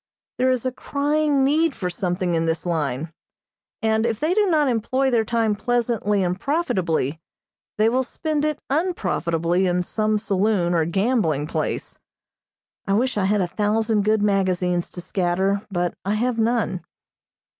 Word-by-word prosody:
There 255 Hz, +1 st, +3 dB
is 255 Hz, -1 st, 0 dB
a 255 Hz, -, +1 dB
crying 290 Hz, +1 st, 0 dB
need 305 Hz, +2 st, +2 dB
for 185 Hz, -, -3 dB
something 180 Hz, 0 st, -1 dB
in 165 Hz, 0 st, +1 dB
this 165 Hz, +1 st, -1 dB
line, 160 Hz, -2 st, -2 dB, 0.7 s
and 220 Hz, 0 st, +2 dB
if 230 Hz, -2 st, -1 dB
they 315 Hz, +4 st, +1 dB
do 415 Hz, +1 st, +3 dB
not 310 Hz, -5 st, +3 dB
employ 260 Hz, +3 st, +1 dB
their 230 Hz, -2 st, +3 dB
time 225 Hz, -1 st, +1 dB
pleasantly 220 Hz, -3 st, 0 dB
and 180 Hz, +1 st, -1 dB
profitably, 175 Hz, -, -1 dB, 0.6 s
they 215 Hz, +1 st, +4 dB
will 250 Hz, +3 st, +2 dB
spend 300 Hz, +3 st, -2 dB
it 305 Hz, -1 st, 0 dB
unprofitably 180 Hz, -, 0 dB
in 180 Hz, 0 st, +1 dB
some 215 Hz, +3 st, 0 dB
saloon 200 Hz, -3 st, +1 dB
or 165 Hz, -2 st, +2 dB
gambling 180 Hz, -, +1 dB
place. 155 Hz, -, -3 dB, 0.9 s
I 195 Hz, -, +1 dB
wish 255 Hz, +6 st, +1 dB
I 200 Hz, -2 st, +1 dB
had 205 Hz, +1 st, +2 dB
a 180 Hz, -, 0 dB
thousand 215 Hz, +2 st, +1 dB
good 215 Hz, 0 st, +2 dB
magazines 185 Hz, -3 st, +1 dB
to 175 Hz, -, -7 dB
scatter, 190 Hz, +2 st, 0 dB
but 175 Hz, -3 st, -1 dB
I 200 Hz, +2 st, 0 dB
have 235 Hz, +1 st, 0 dB
none. 225 Hz, -5 st, 0 dB
210 Hz, 155 wpm, -23 LUFS, 180-250 Hz, 0.9 s, they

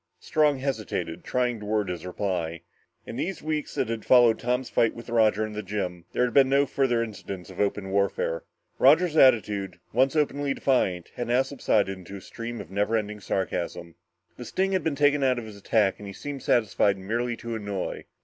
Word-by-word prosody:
Strong 150 Hz, -2 st, +2 dB
hesitated, 110 Hz, -11 st, -3 dB
trying 125 Hz, -2 st, 0 dB
to 105 Hz, -, -8 dB
word 105 Hz, -2 st, 0 dB
his 90 Hz, 0 st, -5 dB
reply. 90 Hz, -4 st, -3 dB, 0.4 s
In 115 Hz, -, -7 dB
these 185 Hz, +7 st, -3 dB
weeks 155 Hz, -1 st, -3 dB
that 130 Hz, -, 0 dB
had 115 Hz, -1 st, -3 dB
followed 120 Hz, -3 st, +5 dB
Tom's 125 Hz, +1 st, -1 dB
fight 115 Hz, -, +2 dB
with 115 Hz, 0 st, -9 dB
Roger 110 Hz, -2 st, +3 dB
in 110 Hz, -, -7 dB
the 105 Hz, -, -3 dB
gym, 90 Hz, -4 st, -4 dB
there -, -, +1 dB
had 125 Hz, -, -3 dB
been 135 Hz, -2 st, +5 dB
no 140 Hz, +1 st, +4 dB
further 130 Hz, -4 st, +1 dB
incidents 100 Hz, -4 st, -7 dB
of 90 Hz, -, -11 dB
open 100 Hz, -1 st, -1 dB
warfare. 100 Hz, -4 st, 0 dB, 0.4 s
Roger's 155 Hz, +5 st, +5 dB
attitude, 105 Hz, -, +3 dB
once 130 Hz, +5 st, +3 dB
openly 145 Hz, -2 st, 0 dB
defiant, 95 Hz, -10 st, 0 dB
had 120 Hz, -, -3 dB
now 125 Hz, +2 st, +3 dB
subsided 110 Hz, -7 st, 0 dB
into 95 Hz, +2 st, -10 dB
a 100 Hz, -, -8 dB
stream 115 Hz, +4 st, -7 dB
of 90 Hz, -, -9 dB
never 105 Hz, +3 st, +1 dB
ending 105 Hz, -1 st, -4 dB
sarcasm. 85 Hz, -3 st, -3 dB, 0.4 s
The -, -, -7 dB
sting 190 Hz, +1 st, 0 dB
had 190 Hz, -1 st, 0 dB
been 160 Hz, -3 st, 0 dB
taken 145 Hz, 0 st, +3 dB
out 130 Hz, -2 st, +3 dB
of 120 Hz, -, -5 dB
his 105 Hz, -2 st, -10 dB
attack 100 Hz, 0 st, +1 dB
and 105 Hz, -, -8 dB
he 100 Hz, -, -7 dB
seemed 140 Hz, +5 st, -6 dB
satisfied 105 Hz, -4 st, +2 dB
merely 115 Hz, +5 st, -2 dB
to 115 Hz, 0 st, -6 dB
annoy. 100 Hz, -4 st, -4 dB
110 Hz, 195 wpm, -26 LUFS, 100-130 Hz, 0.4 s, followed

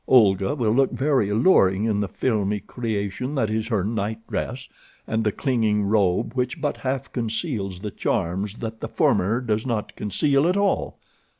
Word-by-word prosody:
Olga 105 Hz, -1 st, +4 dB
will 115 Hz, -6 st, +1 dB
look 135 Hz, +4 st, +3 dB
very 135 Hz, -7 st, +1 dB
alluring 105 Hz, -, +4 dB
in 105 Hz, -2 st, +1 dB
the 100 Hz, -, 0 dB
filmy 105 Hz, -2 st, 0 dB
creation 110 Hz, +4 st, -3 dB
that 110 Hz, -6 st, 0 dB
is 110 Hz, 0 st, -1 dB
her 110 Hz, -6 st, 0 dB
night 110 Hz, +1 st, -2 dB
dress, 130 Hz, +3 st, -4 dB, 0.4 s
and 110 Hz, 0 st, -1 dB
the 105 Hz, -, +2 dB
clinging 110 Hz, -5 st, +1 dB
robe 100 Hz, -3 st, +1 dB
which 125 Hz, +3 st, -2 dB
but 145 Hz, -1 st, -1 dB
half 135 Hz, 0 st, -3 dB
conceals 115 Hz, -, -3 dB
the 105 Hz, -1 st, -4 dB
charms 95 Hz, +6 st, -2 dB
that 115 Hz, -1 st, -5 dB
the -, -, -4 dB
former 105 Hz, +6 st, +2 dB
does 110 Hz, -3 st, -1 dB
not 115 Hz, -5 st, -3 dB
conceal 140 Hz, -, +1 dB
at 180 Hz, +2 st, +2 dB
all. 200 Hz, 0 st, 0 dB
110 Hz, 170 wpm, -24 LUFS, 105-130 Hz, 0.4 s, Olga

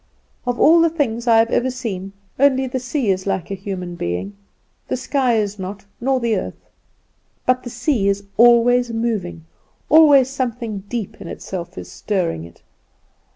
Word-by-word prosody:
Of 245 Hz, 0 st, -1 dB
all 330 Hz, +2 st, +6 dB
the 335 Hz, -, +4 dB
things 245 Hz, -7 st, -2 dB
I 230 Hz, -1 st, +6 dB
have 225 Hz, +1 st, +3 dB
ever 255 Hz, -, +1 dB
seen, 200 Hz, -7 st, -5 dB, 0.3 s
only 265 Hz, -1 st, +4 dB
the 260 Hz, 0 st, -3 dB
sea 245 Hz, -3 st, -1 dB
is 190 Hz, +1 st, -2 dB
like 190 Hz, -2 st, -2 dB
a -, -, -1 dB
human 190 Hz, -2 st, -5 dB
being; 170 Hz, -, -4 dB, 0.5 s
the -, -, -2 dB
sky 255 Hz, -1 st, +1 dB
is 205 Hz, -2 st, -1 dB
not, 195 Hz, +1 st, -7 dB
nor 265 Hz, +2 st, +1 dB
the 235 Hz, -2 st, 0 dB
earth. -, -, -7 dB, 0.7 s
But 255 Hz, 0 st, +2 dB
the 245 Hz, -, -7 dB
sea 245 Hz, -3 st, 0 dB
is 200 Hz, 0 st, 0 dB
always 240 Hz, +1 st, +5 dB
moving, 215 Hz, -8 st, -3 dB, 0.4 s
always 290 Hz, -4 st, +7 dB
something 235 Hz, -6 st, -4 dB
deep 230 Hz, -5 st, -5 dB
in 185 Hz, -, -8 dB
itself 180 Hz, +1 st, -7 dB
is -, -, -8 dB
stirring 175 Hz, -, -2 dB
it. 85 Hz, -, -17 dB
230 Hz, 165 wpm, -20 LUFS, 195-255 Hz, 0.7 s, always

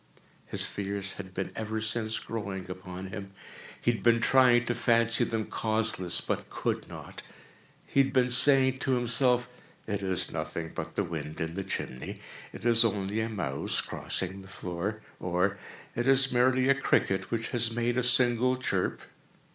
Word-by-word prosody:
His -, -, -1 dB
fears 100 Hz, -1 st, -4 dB
had 95 Hz, -2 st, -9 dB
been -, -, -3 dB
ever 110 Hz, +1 st, -3 dB
since 110 Hz, 0 st, -1 dB
growing 100 Hz, -4 st, -5 dB
upon 90 Hz, 0 st, -7 dB
him. 100 Hz, -1 st, -7 dB, 0.5 s
He 120 Hz, -, +2 dB
had 115 Hz, -, -5 dB
been 115 Hz, 0 st, +4 dB
trying 125 Hz, -1 st, +5 dB
to 120 Hz, -, 0 dB
fancy 115 Hz, -1 st, +3 dB
them 110 Hz, -2 st, -1 dB
causeless, 110 Hz, -5 st, 0 dB
but -, -, -3 dB
could -, -, -3 dB
not. -, -, -9 dB, 0.6 s
He -, -, 0 dB
had 135 Hz, 0 st, 0 dB
been 125 Hz, -2 st, +2 dB
saying 130 Hz, 0 st, +7 dB
to 135 Hz, -, 0 dB
himself—"It 125 Hz, -3 st, 0 dB
is 95 Hz, -2 st, -1 dB
nothing 80 Hz, +1 st, -4 dB
but -, -, -6 dB
the -, -, +1 dB
wind 80 Hz, -2 st, -6 dB
in 80 Hz, 0 st, -3 dB
the 100 Hz, +2 st, -3 dB
chimney—it 65 Hz, -, -7 dB
is 115 Hz, -1 st, +6 dB
only 105 Hz, -1 st, -1 dB
a 110 Hz, -, -2 dB
mouse 80 Hz, -11 st, -2 dB
crossing 95 Hz, +1 st, -4 dB
the 95 Hz, -, -13 dB
floor," 95 Hz, +3 st, -4 dB, 0.2 s
or 90 Hz, +3 st, 0 dB, 0.4 s
"It 120 Hz, +2 st, -1 dB
is 135 Hz, 0 st, +5 dB
merely 130 Hz, +1 st, +3 dB
a 140 Hz, -, +6 dB
cricket 95 Hz, -8 st, +1 dB
which 115 Hz, -1 st, -2 dB
has 120 Hz, -2 st, +1 dB
made 120 Hz, +1 st, -1 dB
a 125 Hz, -, +2 dB
single 125 Hz, 0 st, +2 dB
chirp." 95 Hz, -8 st, -1 dB
110 Hz, 165 wpm, -29 LUFS, 95-120 Hz, 0.6 s, saying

